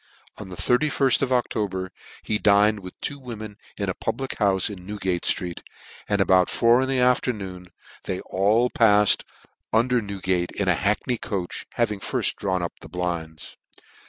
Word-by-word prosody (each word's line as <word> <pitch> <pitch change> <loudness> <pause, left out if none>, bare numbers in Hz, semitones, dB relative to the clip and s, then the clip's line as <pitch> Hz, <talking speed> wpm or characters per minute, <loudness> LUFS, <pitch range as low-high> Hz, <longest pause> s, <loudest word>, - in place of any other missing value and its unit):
On - - -8
the 90 - -7
3 125 +7 +2
1 155 +3 0
ft 135 -3 +2
of 135 -2 0
October 100 -7 -1 0.3
he 105 - -1
dined 105 +1 +4
with 90 -2 -11
two 140 -1 -3
wo 125 -3 -7
men 105 -1 -8 0.2
at 100 - -2
a 95 - 0
public 135 +7 -3
houfe 100 -3 +2
in 90 - -13
Newgate 95 -3 -2
ftreet, 90 -3 -2 0.5
and 100 -1 +1
about 95 -1 +4
four 120 +2 +4
in 130 - -1
the 135 - +1
afternoon 105 -8 0 0.4
they 95 - -2 0.2
ail 110 +6 +3
paffed 105 -3 +4 0.5
under 120 +2 +3
Newgate 95 -3 -1
,in 100 - -2
a 90 - +5
hackney 105 +6 0
coach, 95 -3 -4
having 105 -4 0
firft - - -1
drawn 95 -3 -1
up 85 - -3
the 80 - -11
blinds. 85 -3 -5
100 Hz, 175 wpm, -24 LUFS, 95-120 Hz, 0.5 s, a